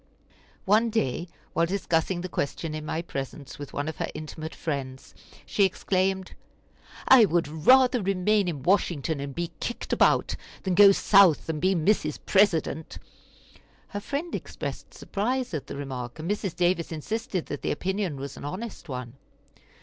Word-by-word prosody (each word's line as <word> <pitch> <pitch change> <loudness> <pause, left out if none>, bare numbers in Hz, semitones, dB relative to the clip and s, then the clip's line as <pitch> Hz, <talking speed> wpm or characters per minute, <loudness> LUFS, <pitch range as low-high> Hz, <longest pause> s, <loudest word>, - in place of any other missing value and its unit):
One 215 +4 +4
day, 175 - -1 0.3
while 165 0 +2
discussing 175 -1 0
the 185 - -4
question 155 -1 -3
in 155 0 -5
my 165 - -2
presence 135 -2 -6
with 145 - -7
one 145 +1 -3
of 160 - -4
her - - -2
intimate 155 +1 -7
friends, 135 -4 -5 0.3
she 145 +8 +1
exclaimed: 190 0 0 0.7
"I 260 -4 +8
would 175 -4 +1
rather 245 - +5
remain 195 +1 +2
in 150 -7 -4
Washington 165 -5 +1
and 140 -1 -5
be 170 0 -3
kicked 240 - -4
about, - - +3 0.3
than 190 - 0
go 200 +2 +8
South 195 -5 +5
and 155 -2 -2
be 190 +2 +3
Mrs. 160 -3 +1
President." 170 -5 +2 0.9
Her 205 - -4
friend 290 +10 -4
expressed - - -6
surprise 245 +3 -2
at 150 - -4
the - - -6
remark, 130 -3 -5
and 155 +1 -6
Mrs. 200 -3 -2
Davis 175 -1 +1
insisted 190 +3 -3
that - - -5
the - - -2
opinion 190 0 -1
was 140 0 -7
an - - -9
honest 185 +3 -6
one. 125 -3 -5
175 Hz, 155 wpm, -26 LUFS, 150-200 Hz, 0.9 s, I